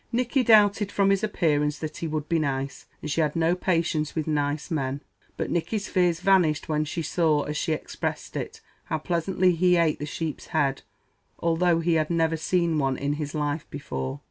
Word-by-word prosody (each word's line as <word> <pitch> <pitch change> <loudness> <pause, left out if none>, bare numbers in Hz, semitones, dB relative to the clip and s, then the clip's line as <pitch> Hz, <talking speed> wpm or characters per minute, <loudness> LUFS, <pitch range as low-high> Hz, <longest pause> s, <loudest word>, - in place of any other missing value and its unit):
Nicky 250 +3 +1
doubted, 210 -3 +4
from 195 -1 +3
his 195 0 +1
appearance, 150 -7 +1
that 155 -1 -6
he 165 - -3
would 155 -1 -3
be 165 -1 +1
nice, 140 -2 -3 0.2
and 150 - -3
she 165 - +1
had 150 -2 0
no 165 +1 +2
patience 165 -4 0
with 155 -2 -1
nice 145 0 -1
men; 140 -3 -2 0.4
but - - -3
Nicky's 200 +5 -1
fears 180 -2 +2
vanished 180 -6 +3
when 155 -1 0
she 165 +2 -4
saw, 155 -3 +2
as 150 - -4
she 160 - -1
expressed 155 - -4
it, - - -5 0.2
"how 160 - -1
pleasantly 180 +3 +1
he 180 +1 +3
ate 165 -3 +2
the 150 - -4
sheep's 155 0 -5
head, 135 -1 0 0.6
although 170 0 +2
he 170 0 +1
had 155 -1 +1
never 165 -1 +1
seen 165 0 +1
one 135 -2 0
in 140 +1 -1
his 145 +1 -4
life 150 0 -2
before." 65 - -5
160 Hz, 195 wpm, -26 LUFS, 150-175 Hz, 0.6 s, doubted